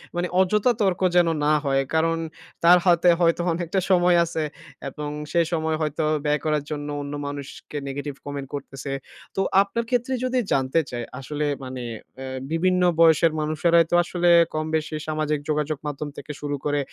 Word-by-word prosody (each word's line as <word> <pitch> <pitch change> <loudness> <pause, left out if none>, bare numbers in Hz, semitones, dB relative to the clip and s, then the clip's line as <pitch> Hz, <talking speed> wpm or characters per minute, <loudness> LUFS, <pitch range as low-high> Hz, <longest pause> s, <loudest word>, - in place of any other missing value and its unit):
মানে 175 +1 0
অযথা 210 +6 +3
তর্ক 190 -2 +1
যেন 175 -1 +5 0.2
না 155 - +4
হয়। 135 0 +2
কারণ 165 +1 +2 0.5
তার 175 +1 +8
হাতে 175 0 +5
হয়তো 170 0 +3
অনেকটা 175 +3 -1
সময় 175 -1 +5
আছে 160 -1 -3 0.5
এবং 150 +2 -6 0.2
সেই 170 -1 +3
সময় 160 -1 0
হয়তো 155 +1 -1 0.2
ব্যয় 150 0 +2
করার 150 -2 +1
জন্য 145 -1 -4
অন্য 145 0 -6
মানুষকে 145 +1 -7
নেগেটিভ 145 +1 -4
কমেন্ট 140 -1 -5
করতেছে। 140 0 -7 0.4
তো 195 - +1 0.2
আপনার 200 +4 -2
ক্ষেত্রে 250 +1 0
যদি 255 0 +1
জানতে 135 +4 +2
চাই 120 -1 -4 0.2
আসলে 150 +3 -3 0.2
মানে 130 -1 -6 0.3
অ্যা 135 0 -7 0.2
বিভিন্ন 180 +2 +2 0.2
বয়সের 165 0 +5
মানুষেরাই 165 +2 +3
তো - - +4
আসলে 175 0 0 0.3
কম-বেশি 155 0 -2
সামাজিক 155 -1 -1
যোগাযোগ 150 0 0
মাধ্যম 145 +1 -4
থেকে - - -7
শুরু 145 -1 -2
করে 145 0 +1
155 Hz, 165 wpm, -24 LUFS, 145-175 Hz, 0.5 s, তার